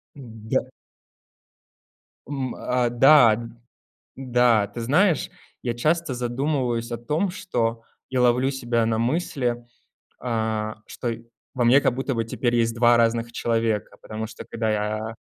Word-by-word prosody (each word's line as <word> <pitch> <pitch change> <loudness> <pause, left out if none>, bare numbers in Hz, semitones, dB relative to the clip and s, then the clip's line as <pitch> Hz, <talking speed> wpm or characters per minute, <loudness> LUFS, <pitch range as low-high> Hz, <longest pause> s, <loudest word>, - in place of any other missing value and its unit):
Да. 110 -5 -4 1.6
М, 135 -3 -4
а, 125 -1 0
да, 120 -2 +6 0.8
да, 120 -5 +2
ты 115 +4 -7
знаешь, 155 - +2 0.3
я 120 - -2
часто 155 +4 0
задумываюсь 125 -1 -2
о 120 - -2
том, 150 +11 -1
что 115 - -2 0.3
я 130 -1 0
ловлю 125 +2 +3
себя 120 -3 0
на 110 0 0
мысли, 120 -2 -1 0.6
а, 110 -3 -2
что 120 - -5
и 115 0 -7 0.3
во 125 - 0
мне 125 +4 +6
как 130 - +1
будто 135 0 -2
бы 115 -1 -1
теперь 120 +1 -1
есть 115 -1 +1
2 120 0 +5
разных 115 0 +1
человека, 115 -3 -1
потому 110 +1 -6
что, 110 - -10
когда 110 -1 -2
я, 110 +1 -2
120 Hz, 140 wpm, -24 LUFS, 115-130 Hz, 1.6 s, да